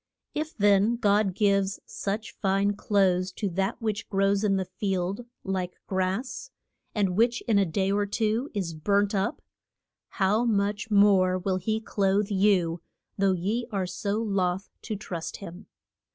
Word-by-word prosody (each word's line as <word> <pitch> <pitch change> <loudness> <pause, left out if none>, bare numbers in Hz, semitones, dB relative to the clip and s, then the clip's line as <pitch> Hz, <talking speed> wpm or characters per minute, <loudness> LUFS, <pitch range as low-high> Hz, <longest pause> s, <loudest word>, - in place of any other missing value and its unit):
If 310 +1 -4
then 205 +2 +4
God 205 -4 +2
gives 195 -2 +2
such 210 +2 -4
fine 195 +1 +1
clothes 190 -3 +1
to 205 - -2
that 195 +6 -1
which 215 -3 -3
grows 195 +1 +2
in 200 -2 +3
the 190 -1 -1
field 190 +3 -3 0.2
like 185 -2 -3
grass, 210 - -2 0.5
and 195 -4 +1
which 235 +3 +2
in 215 -3 +2
a 195 - +2
day 190 +4 0
or 205 0 +1
two 220 +6 0
is 180 -5 -2
burnt 200 +6 +1
up, 200 +8 -1 0.7
how 205 +3 +3
much 205 -1 0
more 200 -3 +5
will 185 0 -1
he 215 +4 -1
clothe 200 -1 0
you, 190 -4 +2 0.3
though 195 -1 +2
ye 210 +7 -1
are 195 -3 -1
so 200 +3 -2
loth 195 -3 -1
to 220 - -4
trust 175 -5 -5
him. 180 -1 -10
200 Hz, 150 wpm, -27 LUFS, 190-210 Hz, 0.7 s, more